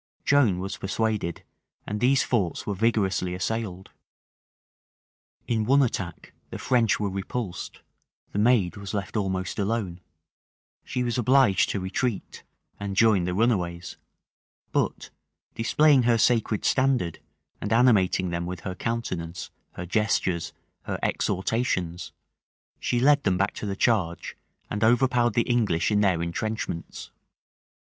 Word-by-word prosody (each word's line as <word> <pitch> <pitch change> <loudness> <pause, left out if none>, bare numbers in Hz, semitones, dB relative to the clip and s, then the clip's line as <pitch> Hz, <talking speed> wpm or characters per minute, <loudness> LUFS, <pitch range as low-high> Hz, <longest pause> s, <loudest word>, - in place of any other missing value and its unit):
Joan 130 -10 +4
was 95 +2 -4
persuaded, 100 -3 -2 0.4
and 105 +1 -3
these 130 +4 +3
forts 100 -9 -1
were 105 - -2
vigorously 95 -4 0
assailed. 95 -1 -4 1.6
In 110 -2 +1
one 135 +5 +4
attack 95 -8 -4 0.2
the - - -6
French 120 -3 +2
were 100 -2 -1
repulsed; 95 +1 -5 0.5
the 105 - -2
maid 105 -5 +3
was 100 +1 -6
left 100 +1 -4
almost 95 -2 -2
alone; 100 -4 -2 0.8
she 125 -1 -2
was 120 0 -1
obliged 125 -5 +4
to 100 - -1
retreat, 100 +4 -3 0.4
and 100 -1 -4
join 105 -4 +4
the 90 0 -2
runaways; 90 -6 0 0.7
but, - - -1 0.4
displaying 140 +4 +4
her 120 -1 +3
sacred 115 -2 +1
standard, 130 - +1 0.4
and 105 - -4
animating 100 -6 +3
them 85 0 -3
with 90 -2 -6
her 95 - -4
countenance, 90 -6 -4 0.2
her 90 - -6
gestures, 95 -3 0 0.3
her - - -3
exhortations, 90 -4 -1 0.7
she 120 - 0
led 145 +3 +4
them 95 -6 +1
back 100 +1 0
to 105 - -6
the 100 - -2
charge, 95 -7 0 0.3
and 105 +1 -3
overpowered 120 0 +3
the 115 - +3
English 110 -8 +1
in 105 0 +3
their 90 -5 +2
intrenchments. 85 0 -4
105 Hz, 130 wpm, -26 LUFS, 90-120 Hz, 1.6 s, Joan